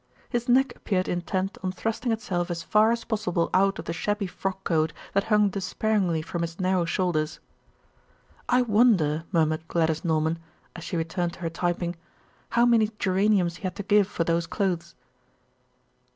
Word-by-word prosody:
His 240 -1 -2
neck 265 +2 +3
appeared 185 -3 -1
intent 185 +2 -2
on 185 0 -1
thrusting 225 +5 -2
itself 185 -6 -2
as 170 -1 -3
far 215 +1 +4
as 230 0 -1
possible 180 -7 -1
out 195 +1 +3
of - - -7
the 170 - -3
shabby 205 +4 -1
frock 190 +1 -4
coat 160 -2 +1 0.2
that 200 0 +2
hung 210 -2 +4
despairingly 190 -3 0
from 170 +1 -4
his 170 +1 -4
narrow 185 -1 +1
shoulders. 160 -3 -1 1.1
"I 250 0 +4
wonder," 205 -9 +3
murmured 160 -2 +1
Gladys 160 -2 0
Norman, 160 0 +1 0.4
as 175 - -8
she 175 - -3
returned 170 +1 -2
to - - -13
her 165 -2 -2
typing, 175 0 -1 0.5
"how 235 +1 +3
many 230 -3 +4
geraniums 190 -3 +2
he - - -19
had 185 -3 -3
to 205 - -5
give 205 0 +4
for 170 - -1
those 165 0 0
clothes." 170 -3 -2
185 Hz, 165 wpm, -26 LUFS, 170-210 Hz, 1.1 s, far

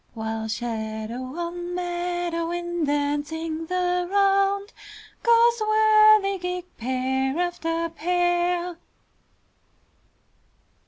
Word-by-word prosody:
While 220 0 -3
shadow 220 0 -4
on 345 +1 -4
meadow 350 -1 -2
in 345 -1 -2
dancing 295 +3 -2
the 360 0 0
round 395 +1 +2 0.5
Goes 470 0 +4
whirligig, 430 -4 +4
pair 260 +3 -1
after 335 -1 -1
pair! 350 +1 0
345 Hz, 70 wpm, -24 LUFS, 290-360 Hz, 0.5 s, Goes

